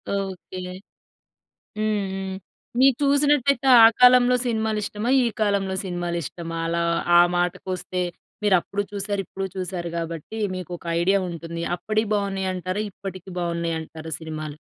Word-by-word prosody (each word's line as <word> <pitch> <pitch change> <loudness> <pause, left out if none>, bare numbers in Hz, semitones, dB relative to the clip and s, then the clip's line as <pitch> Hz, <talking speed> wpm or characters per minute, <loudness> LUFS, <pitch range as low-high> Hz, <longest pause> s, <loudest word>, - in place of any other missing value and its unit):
Okay. 190 -1 -5 1.2
హ్మ్. 215 -2 0
హ్మ్. 190 0 -4 0.4
మీరు 265 -2 +6
చూసినట్లయితే 280 -1 +3 0.2
ఆ - - +12
కాలంలో 250 0 +7
సినిమాలిష్టమా? 220 -1 -1
ఈ - - +2 0.2
కాలంలో 200 -2 +1
సినిమాలిష్టమా? 170 -2 -4
అలా 170 0 0 0.3
ఆ - - +9 0.2
మాటకొస్తే 180 +1 -2 0.4
మీరప్పుడు 200 +1 +2
చూసారు, 200 0 -2
ఇప్పుడు 195 +3 -5
చూసారు 180 -2 -4
గాబట్టి 165 +5 -5 0.2
మీకొక 175 -1 -7 0.2
ఐడియా 195 +3 +3
ఉంటుంది. 170 0 -6 0.2
అప్పటియి 215 +2 -1
బాగున్నాయంటారా? 190 -1 -2
ఇప్పటికి 190 -1 -8
బాగున్నాయంటారా 165 -2 -3
సినిమాలు? 155 -2 -6
190 Hz, 110 wpm, -24 LUFS, 170-210 Hz, 1.2 s, ఆ